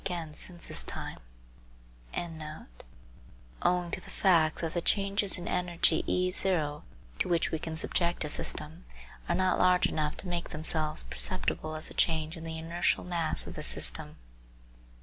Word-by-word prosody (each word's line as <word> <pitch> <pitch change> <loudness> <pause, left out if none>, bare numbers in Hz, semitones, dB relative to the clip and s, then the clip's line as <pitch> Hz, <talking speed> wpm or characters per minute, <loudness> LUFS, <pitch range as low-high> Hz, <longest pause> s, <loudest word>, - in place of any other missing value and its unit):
48), 170 0 -2 2.5
owing 180 -1 +1
to - - -3
the - - -13
fact 165 -5 +3
that 165 -1 -2
the 175 - 0
changes 200 +1 +2
in 175 - -6
energy 175 -2 +2
E 185 0 +2
to 160 -6 0 0.4
which 170 -2 +1
we 160 - -1
can 160 +1 -5
Subject 170 +1 +1
a - - -3
system 160 +3 0 0.5
are 170 - +3
not 185 0 +2
large 180 0 +5
enough 150 -1 -1
to 195 - -7
make 175 -1 -2
themselves 155 0 +1
perceptible 65 - -1
as 155 - -3
a - - -7
change 160 0 +1
in 165 - -8
the 160 0 -4
inertial 165 +2 0
mass 170 -3 -1
of - - -7
the - - -6
system. - - 0
170 Hz, 145 wpm, -30 LUFS, 155-180 Hz, 2.5 s, large